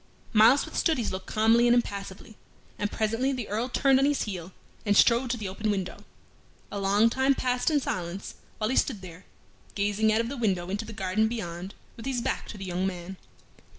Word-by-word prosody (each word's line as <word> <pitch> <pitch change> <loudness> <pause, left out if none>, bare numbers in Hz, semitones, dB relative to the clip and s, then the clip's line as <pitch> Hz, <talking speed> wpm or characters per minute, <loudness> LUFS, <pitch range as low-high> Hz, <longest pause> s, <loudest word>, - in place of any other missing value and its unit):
Myles 225 +6 +6
withstood 325 -4 0
his 230 -4 -1
look 185 0 -6
calmly 225 +2 +4
and 240 - +5
impassively, 200 -2 -3 0.4
and 205 0 -1
presently 225 +5 0
the 250 -5 -4
Earl 225 +5 -2
turned 270 +1 +3
on 275 - +3
his 290 0 +1
heel, 185 -4 -6 0.3
and 205 -2 +2
strode 240 +2 +5
to 240 - 0
the 210 -3 -4
open 210 +3 -3
window. 190 -3 -2 0.7
A 205 - -3
long 200 +3 +4
time 265 +3 +2
passed 250 +2 0
in 300 -2 +3
silence 180 -6 -4 0.2
while 215 +2 -1
he - - 0
stood 210 -8 0
there, 180 0 -11 0.5
gazing 205 +2 +2
out 220 - +2
of 230 - -3
the 275 +3 -5
window 190 -6 0
into 205 +3 -2
the 225 - -8
garden 205 +1 0
beyond 190 -5 -5 0.2
with 230 - -7
his 260 -2 0
back - - -2
to 210 - -8
the 195 - -6
young 185 +1 -1
man. 185 0 -6
215 Hz, 205 wpm, -27 LUFS, 190-240 Hz, 0.7 s, Myles